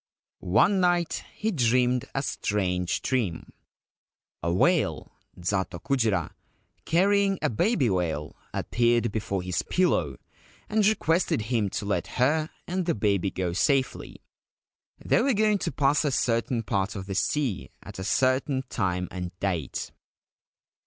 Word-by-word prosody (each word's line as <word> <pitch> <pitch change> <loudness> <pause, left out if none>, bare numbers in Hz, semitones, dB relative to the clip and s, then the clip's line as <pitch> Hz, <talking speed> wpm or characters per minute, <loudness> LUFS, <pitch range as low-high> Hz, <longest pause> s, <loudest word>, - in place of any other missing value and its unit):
One 190 - +5
night 175 -2 +1
he 220 +1 -1
dreamed 125 - +2
a 135 - 0
strange 90 -8 -1
dream. 110 -11 -2 0.9
A 85 - 0
whale 90 - +1 0.3
(zato 90 0 -1
kujira), 110 - 0 0.5
carrying 195 +3 +3
a - - +2
baby 160 - +2
whale, 85 -6 -1 0.2
appeared 120 -1 +1
before 100 -3 -2
his 90 -2 -1
pillow, 90 - +1 0.5
and 210 -1 +2
requested 165 - +1
him 110 -4 +1
to 100 - -4
let 100 - -1
her 155 +5 +2 0.2
and 180 0 -2
the 170 - +2
baby 100 -2 +1
go 90 -2 -3
safely 130 +8 0 0.4
— - - -68
they - - +3
were 270 -3 +2
going 210 -1 +3
to - - -2
pass 145 +2 +2
a 150 - +1
certain 115 -2 0
part 100 -2 -1
of 95 -2 -5
the 95 - -5
sea 125 +1 -1
at - - -10
a - - -4
certain 130 +4 +1
time 90 -4 -1
and 90 0 -6
date. 85 -9 -2
115 Hz, 140 wpm, -26 LUFS, 95-155 Hz, 0.9 s, One